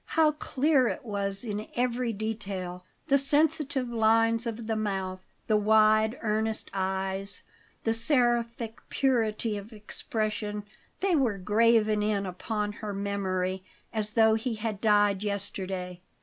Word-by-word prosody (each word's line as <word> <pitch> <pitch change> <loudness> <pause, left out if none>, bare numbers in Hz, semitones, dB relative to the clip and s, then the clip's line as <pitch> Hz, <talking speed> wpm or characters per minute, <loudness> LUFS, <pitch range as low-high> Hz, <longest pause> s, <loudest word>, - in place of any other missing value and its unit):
How 315 -1 +6
clear 285 -2 +2
it 265 - -4
was 200 -2 -2
in 210 -1 -4
every 245 -1 0
detail! 200 -4 -4 0.2
The 275 0 +4
sensitive 285 -2 +2
lines 225 0 +3
of 230 0 -4
the 220 0 -1
mouth, 190 -3 -2 0.3
the 215 - +3
wide, 215 +2 +4
earnest 220 0 -1
eyes, 190 +1 -3 0.4
the 225 - +2
seraphic 235 -2 +1
purity 225 -5 +1
of 205 +3 -9
expression 210 -1 -3 0.4
they 380 -2 +3
were 245 -9 +1
graven 215 +2 +3
in 210 -1 0
upon 205 +3 -3
her 210 -1 -6
memory, 190 -2 -2 0.3
as 215 -1 -1
though 220 -1 +5
he 225 +1 -1
had 215 -2 -4
died 205 -2 +3
yesterday. 190 -3 -3
215 Hz, 130 wpm, -28 LUFS, 200-230 Hz, 0.4 s, How